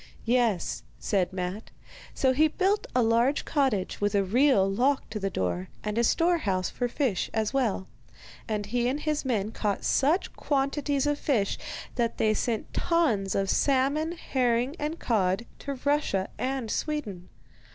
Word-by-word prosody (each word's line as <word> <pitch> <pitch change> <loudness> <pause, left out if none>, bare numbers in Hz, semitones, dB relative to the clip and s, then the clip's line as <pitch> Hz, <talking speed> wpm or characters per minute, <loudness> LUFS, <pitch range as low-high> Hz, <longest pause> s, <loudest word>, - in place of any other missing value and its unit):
'Yes,' 230 -7 +1 0.2
said 190 -3 0
Matte. 185 +3 -4 0.5
So 265 - +3
he 310 +4 +4
built 390 +6 0
a 250 - +4
large 235 +5 +2
cottage, 260 - 0
with 205 0 +1
a 200 - +3
real 225 0 +4
lock 255 +8 +1
to 215 - -3
the 195 -1 -1
door, 90 - -2 0.2
and 210 0 -2
a 235 - +2
store 340 +7 +3
house 185 - -1
for 245 - -1
fish 240 -6 -1
as 220 +2 0
well; 230 -8 0 0.6
and 210 -2 -2
he 240 +3 0
and 275 +4 -1
his 305 -1 -1
men 220 -5 0
caught 210 -3 -2
such 305 +7 +2
quantities 280 0 0
of 290 0 0
fish 220 -9 0 0.4
that 235 -2 0
they 215 -1 +3
sent 225 0 -2
tons 240 - +1
of 195 0 +1
salmon, 280 - +2
herring, 250 -3 0
and 305 +2 -2
cod 195 - 0
to 280 -1 -4
Russian 285 -10 +1
and 260 -4 -2
Sweden. 230 - -3
240 Hz, 160 wpm, -27 LUFS, 200-285 Hz, 0.6 s, he